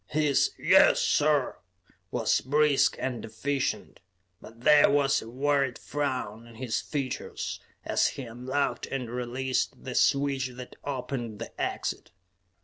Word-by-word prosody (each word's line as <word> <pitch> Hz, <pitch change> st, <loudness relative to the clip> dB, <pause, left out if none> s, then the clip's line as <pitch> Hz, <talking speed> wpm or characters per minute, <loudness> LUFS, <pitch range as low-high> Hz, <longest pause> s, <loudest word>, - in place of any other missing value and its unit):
His 150 Hz, -2 st, +2 dB
"Yes, -, -, +5 dB
sir!" 145 Hz, -2 st, +2 dB, 0.5 s
was -, -, +1 dB
brisk 145 Hz, 0 st, +3 dB
and 130 Hz, -3 st, -3 dB
efficient, 135 Hz, +5 st, -3 dB, 0.4 s
but 115 Hz, +1 st, -14 dB
there 150 Hz, +2 st, +6 dB
was 140 Hz, -1 st, +3 dB
a 110 Hz, -, -9 dB
worried 135 Hz, 0 st, +1 dB
frown 125 Hz, -6 st, -3 dB
on 115 Hz, -, -14 dB
his 120 Hz, 0 st, -2 dB
features 135 Hz, -4 st, -4 dB, 0.3 s
as -, -, +2 dB
he 135 Hz, -, -5 dB
unlocked 125 Hz, +4 st, -2 dB
and 125 Hz, -4 st, -4 dB
released 125 Hz, +1 st, -2 dB
the 130 Hz, -, -5 dB
switch 140 Hz, -1 st, +2 dB
that 125 Hz, 0 st, -9 dB
opened 125 Hz, -5 st, -4 dB
the 115 Hz, -, -7 dB
exit. -, -, -3 dB
130 Hz, 130 wpm, -28 LUFS, 120-145 Hz, 0.5 s, there